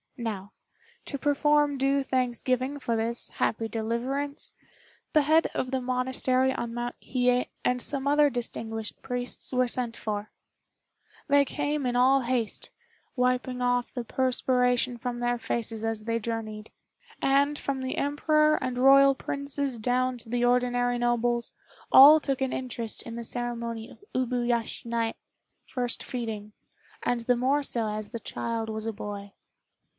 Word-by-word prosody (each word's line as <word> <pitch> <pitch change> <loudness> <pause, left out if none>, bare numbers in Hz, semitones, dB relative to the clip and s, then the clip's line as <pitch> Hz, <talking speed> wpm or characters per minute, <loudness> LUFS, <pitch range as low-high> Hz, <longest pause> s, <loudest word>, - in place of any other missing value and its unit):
Now, 210 -5 -4 0.5
to 280 - -4
perform 290 0 +2
due 275 +1 +2
thanksgiving 255 +1 -1
for 235 -4 -1
this 230 +1 -2
happy 225 0 -1
deliverance, 245 +6 -3 0.6
the 305 - +5
head 315 +3 +4
of 255 - -2
the 265 -1 0
monastery 255 +1 +1
on 235 -2 -4
Mount 240 0 -3
Hiye 250 -1 +1 0.2
and 250 0 +2
some 275 +1 -2
other 295 0 +5
distinguished 225 -3 -5
priests 245 0 -4
were 255 -1 +2
sent 240 -1 -2
for. 210 -1 -4 1.0
They 285 -1 +5
came 290 0 -2
in 245 - -1
all 265 +2 +5
haste, 240 -2 -2 0.5
wiping 250 0 0
off 245 0 +1
the 245 - -3
perspiration 250 0 +1
from 240 0 -4
their 240 0 0
faces 225 -1 0
as 225 -1 -1
they 230 +1 -1
journeyed; 220 -1 -5 0.5
and, 280 +2 +2
from 275 -2 -3
the 260 0 -3
Emperor 305 +2 +3
and 255 -1 -2
Royal 275 +1 +7
princes 280 -2 -2
down 250 +2 0
to 230 - -14
the 245 +1 +1
ordinary 245 0 +2
nobles, 240 0 0 0.4
all 295 +4 +10
took 275 -3 -2
an 265 - 0
interest 235 -3 -3
in 230 - -7
the 235 - -5
ceremony 235 -1 -4
of - - -16
Ub 255 -2 +1
yashinai 235 -1 0 0.5
(first 245 -2 -2
feeding), 220 -4 -5 0.5
and 245 -1 0
the 245 +2 +2
more 270 +4 +2
so 230 -5 -1
as 210 0 -4
the 230 - -5
child 225 0 -3
was 220 0 -4
a 225 - -2
boy. 205 -1 -7
245 Hz, 150 wpm, -27 LUFS, 230-265 Hz, 1.0 s, all